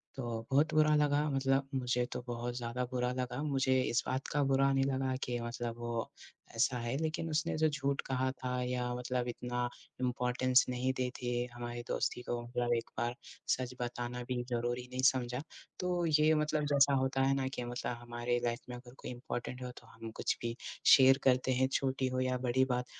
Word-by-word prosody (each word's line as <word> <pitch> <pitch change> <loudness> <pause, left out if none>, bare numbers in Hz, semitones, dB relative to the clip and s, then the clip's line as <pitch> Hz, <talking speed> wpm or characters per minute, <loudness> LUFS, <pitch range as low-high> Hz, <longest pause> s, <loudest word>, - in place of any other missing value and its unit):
तो 135 - -4 0.3
बहुत 150 +3 +3
बुरा 155 0 +5
लगा 145 -1 +3
मतलब 135 0 +2
मुझे 125 -1 +1
तो - - -3
बहुत 120 0 -3
ज़्यादा 120 +1 -2
बुरा 125 0 0
लगा, 125 +2 -2
मुझे 130 -3 +2
इस 120 - +1
बात 130 +1 -2
का 145 - 0
बुरा 135 0 +3
नहीं 135 0 +3
लगा 130 -1 0
कि 120 -1 -2
मतलब 120 0 -4
वो 120 -1 -3 0.5
ऐसा 125 +2 +2
है, 120 +2 -2
लेकिन 160 +1 -2
उसने 160 +2 0
जो 155 0 +4
झूठ 140 -1 -1
कहा 130 0 +1
था 125 -1 -3
या 125 0 -1
मतलब 125 0 -2
इतना 120 0 -2 0.3
इम्पॉर्टेंस 125 +1 +3
नहीं 125 +1 0
दी 125 -1 0
थी 120 0 0
हमारी 120 0 -5
दोस्ती 125 - -1
को, 120 -1 -3
मतलब 120 0 0
एक 115 - -5
बार 120 +1 -1 0.4
सच 125 0 -5
बताना 120 0 -3
भी 125 -1 -1
ज़रूरी 120 +1 -1
नहीं 130 0 -2
समझा। 125 0 -3 0.4
तो 180 -1 0
ये 155 0 +4
मतलब 150 0 +1
जैसा 140 0 +5
होता 130 0 +1
है 135 +1 +4
ना 135 -1 0
कि 125 - -3
मतलब 120 0 -3
हमारे 120 0 -1
लाइफ़ 120 +1 -1
में 125 - -5
अगर 120 0 -13
कोई - - -7
इम्पॉर्टेंट 125 +1 -5
हो 125 - -5
तो - - -19
हम 115 0 -8
कुछ - - 0
भी 115 0 -2 0.3
शेयर 135 0 +8
करते 130 0 +3
हैं, 130 +1 +3
छोटी 130 -1 +1
हो 130 0 -1
या 130 0 +1
बड़ी 130 +1 +2
बात, 125 -1 -1
125 Hz, 200 wpm, -33 LUFS, 120-135 Hz, 0.5 s, शेयर